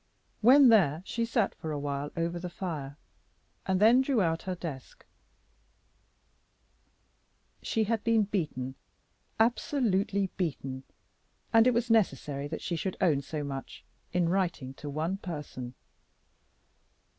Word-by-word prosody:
When 260 +4 +8
there 175 -8 +4
she 230 +2 -1
sat 230 -3 +1
for 160 - -6
a 150 - -2
while 145 0 -3
over 170 +1 -1
the 180 +1 -5
fire, 150 -6 -5 0.7
and 190 -1 +2
then 230 +5 +6
drew 265 -3 +1
out 165 -4 +1
her 185 - -1
desk. 155 -7 -8 2.6
She 225 - 0
had 220 0 -1
been 230 -2 +3
beaten, 150 -10 -3 0.7
absolutely 215 - +1
beaten, 135 -6 -3 0.7
and 225 +1 +6
it 250 - +4
was 235 0 0
necessary 145 -9 +1
that 160 +2 -6
she 175 - -2
should 185 +3 -3
own 155 -7 +3
so 150 +2 -5
much 135 -1 -7 0.3
in 175 -1 +1
writing 170 -8 -1
to 145 +2 -8
one 160 +6 -2
person. 145 -9 -7
175 Hz, 130 wpm, -29 LUFS, 145-220 Hz, 2.6 s, When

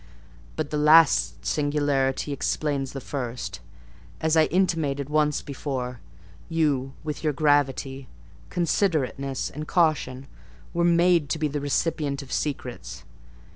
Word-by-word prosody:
But - - -3
the 150 - 0
last 155 +1 +5
singularity 145 -2 0
explains 140 -1 -1
the 135 - -4
first, 125 -2 -5 0.6
as 160 0 +1
I 160 -1 +6
intimated 155 -6 0
once 150 -1 +2
before: 130 -3 -4 0.5
you, 145 -5 0
with 150 0 -5
your 155 -1 +1
gravity, 135 -2 +1 0.4
considerateness, 155 -7 0
and 150 +1 -6
caution 150 -6 +1 0.5
were 170 0 +1
made 170 -3 +4
to 160 - 0
be 155 -1 0
the 145 0 -3
recipient 145 -1 -1
of 130 - -13
secrets. 135 -4 -4
145 Hz, 120 wpm, -25 LUFS, 135-155 Hz, 0.6 s, I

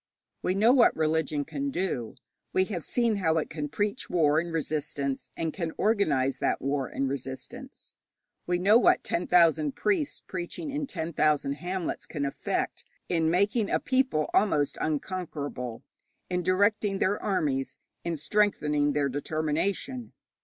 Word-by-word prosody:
We 185 - 0
know 220 +5 +5
what 255 -3 +5
religion 155 -2 0
can 280 0 -3
do. 180 - -2 0.4
We 185 - +4
have 175 -4 -3
seen 235 -3 +1
how 165 -4 +2
it 160 - -2
can 150 -1 -4
preach 205 - -2
war 155 -3 +3
and 170 +1 -4
resistance, 145 -3 -2
and 160 -1 -2
can 170 -4 -3
organize 155 - +2
that - - +1
war 140 -1 -1
and 135 - -2
resistance. 140 - -7 0.5
We 175 0 +2
know 205 +6 +5
what - - +4
ten 175 - -2
thousand 160 -4 +4
priests 345 -8 0
preaching 185 - -5
in 290 0 -2
ten 165 -6 -4
thousand 150 -2 +2
hamlets 180 +4 -4
can 145 -3 -3
effect 140 - -2 0.3
in 165 -2 +2
making 200 +5 +2
a - - +2
people 260 - +1
almost 150 -9 +2
unconquerable, 145 -7 -3 0.5
in 180 0 +1
directing 200 +3 +2
their 195 +2 +1
armies, 145 -9 -1 0.3
in 170 -1 -2
strengthening 150 -4 +1
their 145 -1 +1
determination. 155 - -2
165 Hz, 145 wpm, -28 LUFS, 145-200 Hz, 0.5 s, know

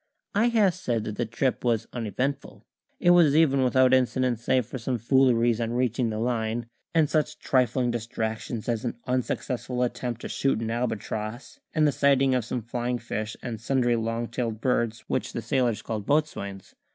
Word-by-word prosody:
I 215 +4 +3
have 215 -6 +3
said 120 - -2
that 105 -1 -5
the 120 - -1
trip 125 +4 -1
was 115 -2 +1
uneventful; 125 +4 -3 0.4
it 175 - +5
was 165 -5 +6
even 140 -4 +4
without 130 0 +4
incident 130 -2 +2
save 125 +1 +1
for 130 - -6
some 125 +2 -1
fooleries 120 -1 +3
on 115 0 -1
reaching 125 -1 +1
the 110 - -3
Line, 115 0 -1 0.3
and 160 -2 +5
such 155 0 0
trifling 125 -1 +1
distractions 110 -1 -4
as 115 -2 -1
an 120 - -3
unsuccessful 125 0 -1
attempt 120 -1 -3
to - - -5
shoot 135 -5 0
an 115 0 -3
albatross, 110 0 -4 0.2
and 155 -1 +4
the - - +3
sighting 135 -1 +3
of 125 -2 +1
some 120 -1 -3
flying 120 +1 -2
fish 110 -2 -4
and 115 -3 -5
sundry 125 -1 +2
long 115 +1 -2
tailed 115 -2 -3
birds 120 -2 0
which - - -2
the - - -3
sailors 120 -4 0
called 105 -3 -4
boatswains. 100 -11 -1
120 Hz, 175 wpm, -26 LUFS, 115-130 Hz, 0.4 s, was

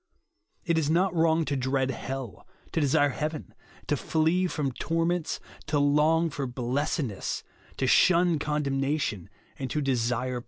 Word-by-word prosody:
It 170 -2 +2
is 150 -2 0
not 180 +3 +2
WTong 165 -1 +3
to 145 - -1
dread 130 0 0
hell, 130 -7 -6 0.2
to 160 - 0
desire 145 0 +3
heaven, 155 +3 -4 0.3
to - - 0
tiee 165 +6 +1
from 145 -5 -1
torments, 165 +4 -1 0.3
to 150 0 +1
long 150 +3 +3
for 140 -2 -3
blessed 130 +6 -1
ness, 105 -7 -4 0.3
to - - 0
shun 170 +4 +4
condemnation, 140 - -1 0.3
and 135 -1 -3
to 150 - -1
desire 125 -2 0
JESUS - - -3
ONLY. 125 - -2
145 Hz, 155 wpm, -27 LUFS, 130-160 Hz, 0.3 s, shun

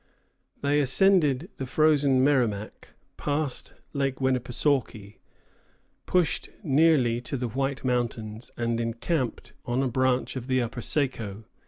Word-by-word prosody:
They 145 +1 +3
ascended 150 +1 +3
the 130 - -4
frozen 140 -2 +3
Merrimac, 120 -7 0 0.3
passed 145 -2 -3 0.2
Lake 135 -2 -1
Winnepesaukee, 125 -4 -1 0.9
pushed 180 -3 +1
nearly 140 -6 +3
to 135 +3 -4
the 125 0 -2
White 135 +3 -2
Mountains, 115 -3 -2
and 115 -1 -1
encamped 120 +4 -2
on 125 +2 0
a - - +1
branch 130 +1 0
of 130 -1 -5
the 130 -1 +2
upper 120 0 -3
Saco. 115 -7 -2
130 Hz, 120 wpm, -26 LUFS, 120-145 Hz, 0.9 s, They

